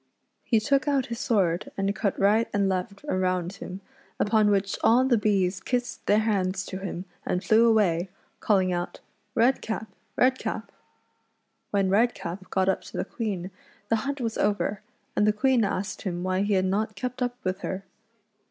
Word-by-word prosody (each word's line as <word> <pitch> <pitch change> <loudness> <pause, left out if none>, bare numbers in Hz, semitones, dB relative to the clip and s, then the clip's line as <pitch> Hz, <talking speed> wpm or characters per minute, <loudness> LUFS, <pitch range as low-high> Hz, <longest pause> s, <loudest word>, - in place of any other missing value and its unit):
He 225 - +3
took 275 +7 +1
out 275 -3 +2
his 235 - -6
sword 190 -5 +1
and 195 +1 0
cut 200 -4 -1
right 210 +3 +4
and 200 -1 +2
left 190 +5 -3
around 185 -4 0
him, 185 0 -7 0.4
upon 215 0 +3
which 195 -1 +1
all 245 +3 +5
the 260 -2 +4
bees 195 -4 +1
kissed 245 +4 -2
their 205 - +5
hands 190 -4 0
to 190 - -6
him 190 -1 -5 0.2
and 180 - -1
flew 225 +2 +5
away, 190 -5 +2 0.3
calling 190 -3 +2
out 175 0 -3
— - - -42
" 210 0 -45
Redcap! 225 -2 +1 0.3
Redcap 260 +1 0 0.5
!" - - -48
When 195 -2 +1
Redcap 195 -4 0
got 190 -1 +1
up 190 - +2
to - - -8
the - - -1
Queen 200 -8 -4 0.4
the 225 - +3
hunt 275 +5 -3
was 230 -3 -2
over, 205 0 0 0.3
and 210 - +3
the - - +6
Queen 255 +1 +3
asked 195 -1 -2
him 175 -3 -3
why 185 +1 0
he 205 +1 +1
had 190 -1 +3
not 210 +3 0
kci)t 250 +4 -4
up 245 0 0
with 185 0 -1
her. 190 0 -4
205 Hz, 180 wpm, -26 LUFS, 185-225 Hz, 0.5 s, the